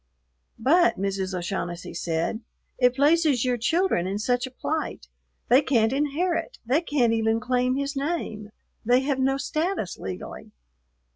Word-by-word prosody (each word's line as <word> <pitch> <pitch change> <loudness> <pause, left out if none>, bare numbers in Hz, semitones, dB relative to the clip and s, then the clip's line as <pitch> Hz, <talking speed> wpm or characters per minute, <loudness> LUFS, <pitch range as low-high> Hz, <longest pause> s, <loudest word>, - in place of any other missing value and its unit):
"But," 340 +9 +3
Mrs. 195 -1 -2
O'Shaughnessy 175 -1 -4
said, 170 +7 -2 0.4
"it 250 -1 +4
places 290 -3 +3
your 250 -1 +2
children 320 - +1
in 195 +2 -2
such 245 +4 0
a - - -8
plight; 295 - -4 0.4
they 255 +4 +6
can't 240 -4 +2
inherit, 325 +4 -1
they 265 +7 +2
can't 265 -8 +1
even 225 0 +1
claim 250 +1 +1
his 280 +1 -2
name, 275 -8 -3 0.3
they 245 +3 +4
have 270 -1 -1
no 270 +1 +2
status 310 - -2
legally." 95 -1 -7
255 Hz, 140 wpm, -25 LUFS, 220-290 Hz, 0.4 s, they